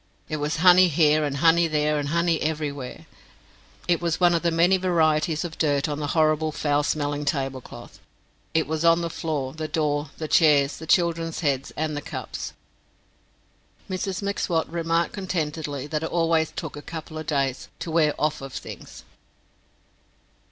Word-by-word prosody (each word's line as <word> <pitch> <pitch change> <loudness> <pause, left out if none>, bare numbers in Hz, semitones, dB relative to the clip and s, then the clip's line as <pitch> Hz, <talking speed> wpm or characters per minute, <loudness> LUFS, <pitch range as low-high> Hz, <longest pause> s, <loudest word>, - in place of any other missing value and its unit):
It 155 - -2
was 150 +1 -1
honey 180 +2 +7
here 155 -1 +3
and 140 -1 -2
honey 165 +3 +4
there 150 -1 +1
and 145 -1 -3
honey 170 +1 +1
everywhere. 150 -4 -3 0.8
It 175 -1 +2
was 170 -2 -1
one 175 -1 +5
of 170 - +1
the 170 - +2
many 170 +3 +3
varieties 160 -3 +1
of 165 -2 -8
dirt 145 -1 +1
on 150 -1 -3
the 145 - -2
horrible 155 0 +2
foul 145 -1 +1
smelling 145 -1 -1
tablecloth. 135 -3 -4 0.6
It 160 - +3
was 160 +1 -2
on 165 0 +5
the 170 -1 -3
floor, 145 -5 -3
the 155 0 -4
door, 150 -2 -1
the 155 - -4
chairs, 145 -3 +4
the 160 - -9
children's 165 -1 +1
heads, 140 -3 0
and 155 -1 -1
the 145 - -3
cups. - - -6 1.3
Mrs 190 0 -3
M'Swat 180 -4 -1
remarked 165 0 0
contentedly 155 -7 -3
that 150 +1 -3
it 160 - -3
always 165 -2 +1
took - - -6
a 145 - -7
couple 160 0 -7
of 155 - -8
days 135 -3 -1
to 165 - -5
wear 155 -2 +3
"off 150 -1 0
of" 135 -1 -8
things. - - -9
155 Hz, 165 wpm, -24 LUFS, 145-165 Hz, 1.3 s, honey